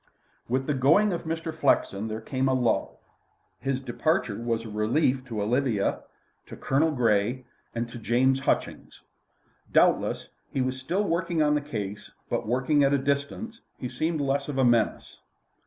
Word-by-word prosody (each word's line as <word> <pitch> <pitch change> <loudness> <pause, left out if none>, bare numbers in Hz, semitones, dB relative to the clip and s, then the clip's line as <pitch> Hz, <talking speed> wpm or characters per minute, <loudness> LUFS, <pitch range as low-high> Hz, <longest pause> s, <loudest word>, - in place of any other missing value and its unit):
With 130 +2 0
the 150 - 0
going 165 +10 +4
of 170 - -4
Mr. 165 0 -3
Flexen 110 -6 +1
there 110 0 -4
came 130 +3 -1
a 130 - +2
lull. 120 -2 0 0.6
His 135 +1 -1
departure 155 - 0
was 115 -1 -2
a - - -7
relief 125 +5 +1
to 110 -5 -3
Olivia, 120 -2 +1 0.5
to - - -9
Colonel 145 +4 +1
Grey, 120 -2 +1 0.3
and 115 0 -1
to 120 - -7
James 130 +4 +2
Hutchings. 140 - -2 0.7
Doubtless - - +2 0.2
he - - -2
was 130 0 -1
still 180 +10 -1
working 170 -3 0
on 150 0 +3
the 150 - +1
case; 105 -8 -5 0.2
but, - - -1
working 130 +5 +2
at 140 0 +3
a - - +3
distance, 140 - -2 0.2
he 125 - -4
seemed 155 +5 -1
less 140 +1 0
of 140 - -3
a 135 - +4
menace. 115 -3 +1
130 Hz, 165 wpm, -27 LUFS, 120-150 Hz, 0.7 s, going